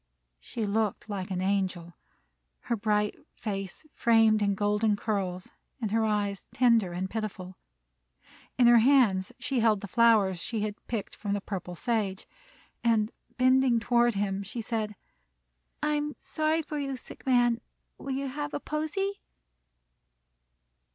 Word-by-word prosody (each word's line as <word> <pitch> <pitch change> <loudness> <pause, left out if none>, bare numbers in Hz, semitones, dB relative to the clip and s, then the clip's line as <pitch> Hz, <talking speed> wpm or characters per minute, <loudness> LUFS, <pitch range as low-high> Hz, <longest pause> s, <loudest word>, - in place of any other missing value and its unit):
She 220 - -4
looked 210 0 -1
like 195 -2 -4
an 185 -1 -2
angel, 185 -3 -1 0.7
her 235 - -1
bright 210 -1 +1 0.2
face 195 - -5
framed 225 -2 +4
in 200 -1 +2
golden 210 +1 +2
curls 195 -4 -3 0.3
and 220 -4 -2
her 225 +1 +2
eyes 205 -2 -1
tender 230 -7 +4
and 180 +2 -3
pitiful. 190 -3 -5 1.0
In 250 - +5
her 240 0 +8
hands 225 -7 +4
she 275 -3 -1
held 220 -3 +3
the 200 - -6
flowers 215 -3 +4
that - - -6
she 225 -3 -2
had 210 0 -5
picked 225 -4 -4
from 205 -1 -3
the 205 - 0
purple 185 -3 -5
sage, 210 -2 -1 0.6
and, 225 -2 +2 0.3
bending 255 -1 +4
toward 240 -1 +2
him, 195 -1 -1
she 200 +4 -6
said: 220 -2 -2 0.9
"I'm 295 0 0
sorry 315 +1 0
for 300 0 -4
'ou, 275 -2 -3
sick - - -12
man. 240 -2 +3 0.4
Will 270 -1 -3
'ou - - -2
have 290 +2 -4
a - - -1
posy?" 315 +8 -2
220 Hz, 145 wpm, -28 LUFS, 200-245 Hz, 1.0 s, her